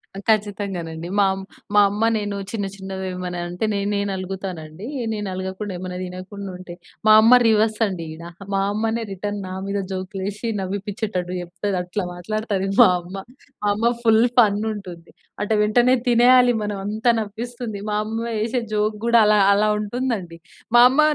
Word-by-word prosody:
ఆ! - - -7
ఖచ్చితంగానండి. 195 -6 -1
మా 200 - +6
ఆమ్ 190 0 -6 0.3
మా 205 - +8
అమ్మ 205 +2 -2
నేను 205 -1 -3 0.2
చిన్న, 210 -3 -2
చిన్నవి 190 -1 -6
ఏమన్నా 180 -1 -4
అంటే, 180 +5 -2
నేనే 200 0 -1
నలుగుతాను 190 -1 -4
అండి. 170 +9 -9 0.3
నేను 210 -1 -4
ఆలగకుండా, 190 +2 -4
ఏమైనా 180 0 -5
తినకుండా 185 +2 -7
ఉంటే, 180 -1 -10 0.3
మా 215 - +8
అమ్మ 240 +3 +7
రివర్స్ 220 0 +2
అండి 180 -4 -5
ఈడ. 165 +1 -11 0.3
మా 195 - +2
అమ్మనే 225 +2 -1
రిటర్న్ 205 +2 -4
నా 185 - -6
మీద 200 0 -2
జోక్‌లు 190 +1 -5
ఏశి, 210 +3 -6
నవ్విపించేటట్టు 200 -1 -3
చెప్తది, 185 +3 -3
అట్లా 180 +3 -3
మాట్లాడుతది 200 +2 -2
మా - - +8
అమ్మ. 175 +2 -10 0.5
మా - - +1
అమ్మ 230 +3 +1
ఫుల్ 225 0 +5
ఫన్ 210 -3 +5
ఉంటుంది. 180 -5 -9 0.3
అట 205 - -2
వెంటనే 240 +4 +4
తినేయాలి 245 +1 +6
మనం. 210 0 -2
అంతా 215 +3 0
నవ్విస్తుంది. 225 +1 -5
మా 210 - 0
అమ్మ 225 +1 -4 0.2
ఏశే 235 +3 0
జోక్ 210 0 +1
కూడా 235 0 +5
అలా, 210 0 +4
అలా 210 +1 +3
ఉంటుందండి. 210 -6 -3 0.4
మా - - +9
అమ్మ 270 +4 +3
205 Hz, 165 wpm, -22 LUFS, 185-220 Hz, 0.5 s, మా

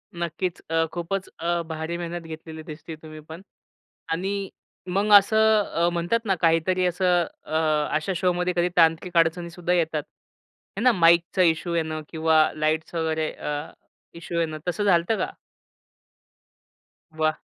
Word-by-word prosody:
नक्कीच. 170 +1 -3
अ, 165 0 +2
खूपच 185 +2 -3
अ, 170 +1 0
भारी 160 +1 -4
मेहनत 175 0 -5
घेतलेली 160 0 -8
दिसते 155 0 -9
तुम्ही 155 0 -11
पण. 160 +3 -8 0.7
आणि 195 +3 -2 0.4
मग 200 +4 0
असं 220 +1 +3
अ, 170 -2 0
म्हणतात 175 +7 0
ना, 195 -3 +2
काहीतरी 170 +3 +2
असं, 180 -1 +2 0.2
अ, 155 - -4 0.4
अशा 155 +5 -1
शोमध्ये 180 0 0
कधी 175 +1 +2
तांत्रिक 165 +1 +3
अडचणीसुद्धा 170 +1 +1
येतात. 160 -3 0 0.7
आहे - - -2
ना 250 - +6
माईकचा 170 -1 +4
इशू 170 0 +2
येणं, 160 -1 -2
किंवा 160 -1 +3
लाईट्स 155 +2 -1
वगैरे 160 -1 -1 0.9
इशू 170 0 -4
येणं, 160 -2 -1
तसं 180 +4 -1
झालतं 190 +2 +3
का? - - -1 1.9
वाह! 155 -1 0
170 Hz, 135 wpm, -24 LUFS, 160-180 Hz, 1.9 s, ना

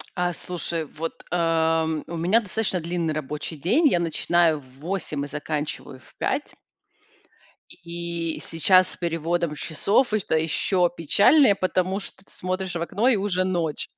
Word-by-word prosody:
А, 175 -1 0
слушай, 170 -2 -3
вот, 165 +3 -7
ам, 160 -2 +1
у 170 - -5
меня 180 +7 +3
достаточно 205 -2 -1
длинный 170 -1 -2
рабочий 150 +1 -4
день. 245 - +3
Я 175 - +3
начинаю 170 -1 +2
в 130 -1 -19
8 160 -3 -3
и - - -4
заканчиваю 150 -2 -4
в - - -22
5. - - -2 1.3
И 170 -1 -3
сейчас 185 +3 +4
с - - -6
переводом 170 -1 -1
часов- 200 - +1
это 210 -6 +1
еще 175 +3 +1
печальнее, 205 - +5
потому 185 0 0
что 195 -1 -11
ты - - -22
смотришь 185 0 -3
в 170 - -2
окно, 205 +7 0
и 260 - +5
уже 195 -2 0
ночь. 175 -5 -1
170 Hz, 150 wpm, -24 LUFS, 160-185 Hz, 1.3 s, печальнее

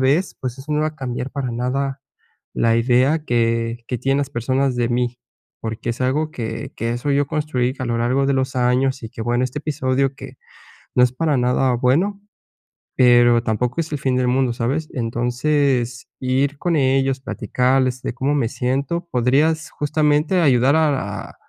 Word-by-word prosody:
vez, 145 +8 +2
pues 125 -1 -4
eso 150 +3 -5
no 150 - +1
va 155 - +1
a 155 - -11
cambiar 130 -1 -4
para 140 -4 -3
nada 135 +3 -2 0.5
la 115 0 +2
idea 130 +6 +3
que 115 -1 0
que 125 - -2
tienen 135 +3 +1
las 140 -1 -2
personas 130 +1 0
de 120 -1 +1
mí, 120 0 -1 0.4
porque 110 +1 -4
es 115 - -6
algo 150 +5 0
que 115 -4 -5
que 115 0 -2
eso 125 +4 -2
yo 140 0 +2
construí 135 -4 -1
a 130 - -3
lo 115 0 -1
largo 130 +4 +1
de 140 - +2
los 130 0 -1
años. 125 +1 +1
Y 115 - -7
que, - - -10
bueno, 120 +2 +1
este 130 - -4
episodio 135 -2 0
que - - -10 0.6
no 125 - +4
es 125 - 0
para 150 +1 0
nada 125 +1 +2
bueno, 165 +12 +1 0.8
pero 120 -1 +5
tampoco 120 +7 -1
es 160 - -4
el 145 - -1
fin 130 -2 0
del 125 -1 +1
mundo, 130 -1 +2
¿sabes? 135 +7 -2
Entonces, 125 +1 0
ir 135 +2 0
con 175 -2 0
ellos, 135 -1 +2
platicarles 130 +1 0
de - - -3
cómo 140 +4 0
me 125 -6 +1
siento. 140 +9 -2
Podrías 145 +6 +1
justamente 150 +4 +1
ayudar 135 -1 +4
a 135 -11 -1
a, - - -16
130 Hz, 180 wpm, -20 LUFS, 120-140 Hz, 0.8 s, pero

